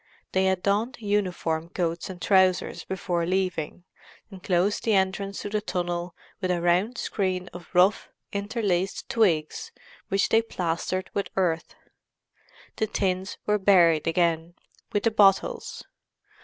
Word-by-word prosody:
They 190 0 +2
had 190 -1 +1
donned 215 +7 0
uniform 180 -6 -1
coats 170 0 -2
and 185 -2 -8
trousers 185 -1 +2
before 180 -2 -2
leaving, 180 -3 -1 0.5
and 190 -2 -10
closed 185 +3 +1
the 220 -2 +2
entrance 195 +1 -1
to 205 - -4
the 210 0 -1
tunnel 175 -2 -3 0.3
with 185 - -1
a 180 -1 +1
round 180 +8 +1
screen 185 -3 -2
of 175 0 -10
rough, 185 +3 +4 0.2
interlaced 200 -3 -1
twigs 170 -9 +1 0.4
which 195 0 +1
they 225 - +5
plastered 185 -3 -3
with 200 - -2
earth. 170 -4 0 1.0
The 220 - 0
tins 190 -1 -1
were 210 0 +2
buried 170 -6 +4
again, 165 0 +1 0.4
with 205 - 0
the 230 - +3
bottles. 195 -3 +2
185 Hz, 135 wpm, -26 LUFS, 175-200 Hz, 1.0 s, they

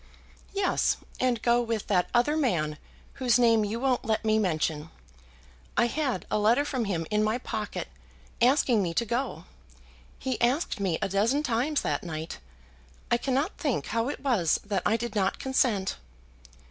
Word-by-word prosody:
"Yes, 395 -2 +1 0.2
and 250 -3 +1
go 240 0 +4
with 230 -3 -2
that 180 -3 +1
other 245 +5 +2
man 165 - 0 0.4
whose 245 -2 +4
name 230 -3 +4
you 210 +3 -2
won't 260 -1 +1
let 220 0 -1
me 220 0 +3
mention. 160 -5 -1 0.9
I 235 - +5
had 255 - -1
a - - +2
letter 230 +7 +3
from 255 -5 -1
him 175 -5 -2
in 210 0 +2
my 215 +2 +1
pocket 220 -4 -4 0.5
asking 245 -3 +4
me 170 -3 -2
to 235 - +1
go. 240 +5 -2 0.7
He 260 -3 -3
asked 250 +2 +1
me 185 -5 0
a - - +1
dozen 225 +10 +2
times 270 +3 0
that 145 - -1
night. 160 -2 -6 0.7
I 240 - +5
cannot 275 - -1
think 260 - -1
how 230 +3 +1
it - - -5
was 225 - +2
that 200 -3 -1
I 225 - +2
did 235 -1 -4
not 195 -2 +1
consent." 245 -7 0
230 Hz, 165 wpm, -28 LUFS, 200-255 Hz, 0.9 s, I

